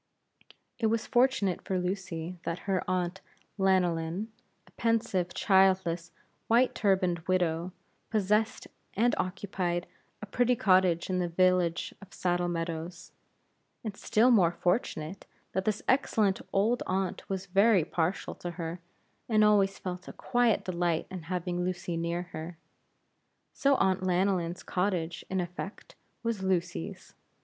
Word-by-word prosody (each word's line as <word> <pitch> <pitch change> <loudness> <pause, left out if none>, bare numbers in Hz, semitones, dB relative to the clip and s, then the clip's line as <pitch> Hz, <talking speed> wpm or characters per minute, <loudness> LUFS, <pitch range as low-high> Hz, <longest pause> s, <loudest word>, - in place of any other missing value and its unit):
It 225 - +2
was 225 0 0
fortunate 240 -7 +2
for 190 - -1
Lucy 180 -2 -3
that 170 -1 -3
her 195 -2 0
Aunt 185 0 -1 0.4
Lanyllyn 185 +1 +1 0.4
a - - -22
pensive, 225 -6 0
childless, 190 -3 +3 0.4
white 240 +3 +4
turbaned 190 -4 +2
widow 175 -1 +1 0.4
possessed 215 +1 +1 0.3
and 235 +4 +3
occupied 185 -2 -2 0.3
a - - -6
pretty 245 +4 +2
cottage 185 -5 +3
in 185 - +1
the 180 - 0
village 180 0 +2
of 200 -1 -13
Saddle 175 -1 0
Meadows; 165 0 -4 0.7
and 215 -3 -4
still 230 +5 +3
more 185 -8 +5
fortunate, 175 -1 -2 0.2
that 190 0 -1
this 210 -1 -1
excellent 215 -7 +2
old 220 +5 +2
aunt 185 -1 -2
was 190 -1 -3
very 195 -2 +4
partial 170 +3 -1
to 175 - -6
her, 170 0 -4 0.5
and 215 -2 +4
always 200 -2 +4
felt 180 0 -6
a - - -7
quiet 240 -3 +1
delight 175 -3 0
in 185 -2 -5
having 180 -1 -2
Lucy 175 -1 -3
near 170 +1 -1
her. 160 +2 -7 1.0
So 280 -1 +3
Aunt 190 -5 +2
Lanyllyn's 180 -1 0
cottage, 180 -3 -1
in 190 - 0
effect, 180 +3 -6 0.3
was 230 -4 -1
Lucy's. 185 0 -2
185 Hz, 130 wpm, -29 LUFS, 175-200 Hz, 1.0 s, more